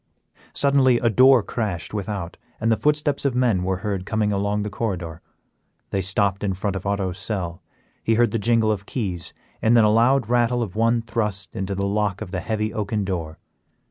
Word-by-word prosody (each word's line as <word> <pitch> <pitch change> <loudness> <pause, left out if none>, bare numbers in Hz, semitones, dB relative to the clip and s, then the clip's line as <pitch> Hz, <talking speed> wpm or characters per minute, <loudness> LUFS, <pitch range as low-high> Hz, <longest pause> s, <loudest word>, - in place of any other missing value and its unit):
Suddenly 135 -3 +4
a 115 -1 +1
door 130 +1 +6
crashed 100 -8 -4
without, 100 -4 -4 0.2
and 115 +1 +1
the - - +4
footsteps 150 +1 +1
of 140 -3 0
men 120 -7 +2
were 95 0 -1
heard 100 -3 -2
coming 105 +1 0
along 100 +1 0
the 105 - -3
corridor. 90 -7 -4 0.7
They 95 - 0
stopped 100 +1 +1
in 95 -2 0
front 100 +1 -2
of 95 +1 -4
Otto's 95 -2 -2
cell; 95 -3 -4 0.4
he 115 - +2
heard 120 +1 +3
the 115 - -1
jingle 115 0 +2
of 100 -1 -4
keys, 95 -8 -4 0.3
and 115 +2 +4
then 115 - +6
a 105 - +4
loud 120 +2 +3
rattle 120 0 +2
of 100 -4 -7
one 115 +1 +2
thrust 105 -4 -3
into 95 +1 -3
the 100 +1 -1
lock 100 -1 0
of 110 -4 -7
the 90 - -2
heavy 110 0 -2
oaken 105 -2 -2
door. 85 -4 -4
105 Hz, 195 wpm, -23 LUFS, 95-115 Hz, 0.7 s, door